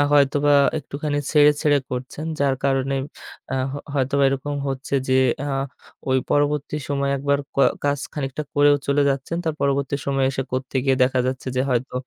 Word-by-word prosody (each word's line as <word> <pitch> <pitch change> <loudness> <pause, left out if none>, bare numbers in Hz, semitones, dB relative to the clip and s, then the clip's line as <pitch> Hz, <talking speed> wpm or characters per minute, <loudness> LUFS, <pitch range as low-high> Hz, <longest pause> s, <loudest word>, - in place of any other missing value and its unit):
হয়তোবা 145 0 +4 0.3
একটুখানি 145 +1 -3
ছেড়ে, 150 -1 +6
ছেড়ে 145 -2 +3
করছেন। 130 +5 -5
যার 140 -1 +3
কারণে 135 0 +1 0.6
আ - - 0 0.2
হ - - -5 0.2
হয়তোবা 140 0 +1
এরকম 135 +2 -2
হচ্ছে 135 +1 -4
যে, 130 - +3 0.3
আ - - -2 0.6
ওই 130 - +4
পরবর্তী 145 0 +1
সময়ে 140 -1 0
একবার 140 +1 +1 0.2
কয় 140 - +5
কাজ 145 0 +1
খানিকটা 140 -1 -3
করেও 145 0 +5
চলে 140 +1 +2
যাচ্ছেন। 135 +4 -3
তার 160 -2 -1
পরবর্তী 140 0 0
সময়ে 135 -1 +1
এসে 135 0 -2
করতে 130 +1 -4
গিয়ে 135 -1 +3
দেখা 130 0 +2
যাচ্ছে 130 0 -3
যে 130 - +2
হয়তো 125 +1 -1
140 Hz, 170 wpm, -22 LUFS, 135-145 Hz, 0.6 s, ছেড়ে